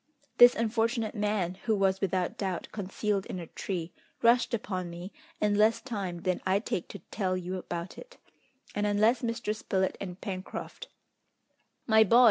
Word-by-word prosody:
This 245 0 +9
unfortunate 230 0 0
man, 205 -5 0
who 220 - +3
was 195 -1 +2
without 185 -2 0
doubt 190 -3 -3
concealed 200 0 -2
in - - -5
a 175 - -5
tree, 175 0 -4 0.3
rushed 235 +1 +5
upon 185 -6 -2
me 175 +3 -7 0.3
in 210 -1 +2
less 215 +2 +4
time 195 -9 -4
than 185 -1 0
I 190 +1 +3
take 195 -4 -3
to - - -9
tell 185 -3 0
you 185 +1 -4
about 175 -1 -5
it, - - -13 0.6
and 205 0 0
unless 215 +4 +3
Mr. 230 -2 -2
Spilett 190 -3 -1
and 180 -2 -6
Pencroft 190 - -6 0.5
" - - -46
"My 220 - +9
boy!" 230 +4 +5
200 Hz, 165 wpm, -29 LUFS, 185-220 Hz, 0.6 s, This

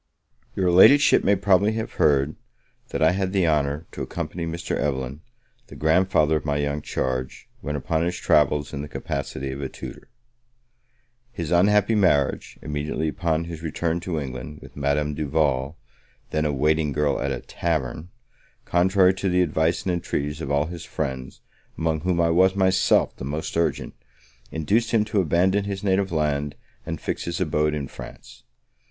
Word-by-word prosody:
Your 90 -2 +2
Ladyship 140 +11 +7
may 100 - +4
probably 100 +2 +3
have 110 0 -4
heard, 70 0 +3 0.5
that - - -1
I 80 - +5
had 95 0 -1
the 95 -4 +2
honour 75 0 0
to - - -7
accompany 85 0 -4
Mr. 85 +1 -3
Evelyn, 70 0 -2 0.5
the - - -12
grandfather 80 -1 +3
of - - -6
my 75 -1 -1
young 70 0 -1
charge, 65 -2 -3
when 75 - -4
upon 80 +3 -1
his 90 +1 -1
travels, 75 0 +2
in 70 - -3
the 75 - -6
capacity 70 -1 -4
of 70 +1 -6
a 70 - -3
tutor. - - -10 1.2
His 85 -8 -5
unhappy 105 +4 +4
marriage, 90 -10 +1
immediately 75 +1 -2
upon 80 0 -1
his 85 -1 -7
return 80 +1 -1
to 85 -2 -3
England, 70 +2 -6
with - - -14
Madame 75 +1 0
Duval, 70 -1 0 0.5
then 75 0 0
a 75 - +1
waiting 75 +1 +1
girl 75 -1 0
at - - -1
a - - -3
tavern, 80 -1 -3 0.6
contrary 95 +1 +4
to 95 +1 -2
the 90 0 +3
advice 80 0 0
and 95 - 0
entreaties 75 -3 -3
of 70 - -4
all 70 +1 +2
his 85 0 -7
friends, 65 -1 -5 0.4
among 80 -1 0
whom 90 0 0
I 85 -1 +3
was 95 +3 +4
myself 95 -1 +3
the - - -8
most 75 +4 -4
urgent, 85 0 -1 0.6
induced 100 - 0
him 110 -2 +2
to 105 -1 +1
abandon 95 +5 +2
his 100 -1 -4
native 95 -1 +1
land, 75 -2 -1 0.3
and - - -4
fix - - -3
his 85 0 -3
abode 75 -3 +1
in 70 -2 -4
France. - - -11
80 Hz, 170 wpm, -24 LUFS, 75-90 Hz, 1.2 s, Ladyship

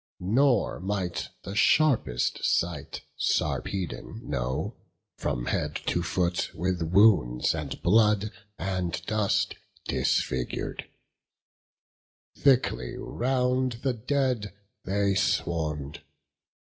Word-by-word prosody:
Nor 120 +4 +2
might 95 -2 -2
the 95 - -6
sharpest 110 - +2
sight 85 -4 0 0.2
Sarpedon 95 -5 -2
know, 60 +2 -2 0.4
From 60 -3 -2
head - - -1
to 85 - +1
foot 85 +1 0
with 90 +1 -1
wounds 85 - +4
and - - -5
blood 105 +2 +4 0.3
and 90 -3 -2
dust 110 -2 +1 0.3
Disfigur'd; 65 -1 -1 1.5
thickly 125 - +2
round 125 0 0
the 135 -2 +1
dead 125 -3 -1 0.3
they 100 +1 +1
swarm'd. 80 -6 -1
95 Hz, 85 wpm, -27 LUFS, 85-115 Hz, 1.5 s, wounds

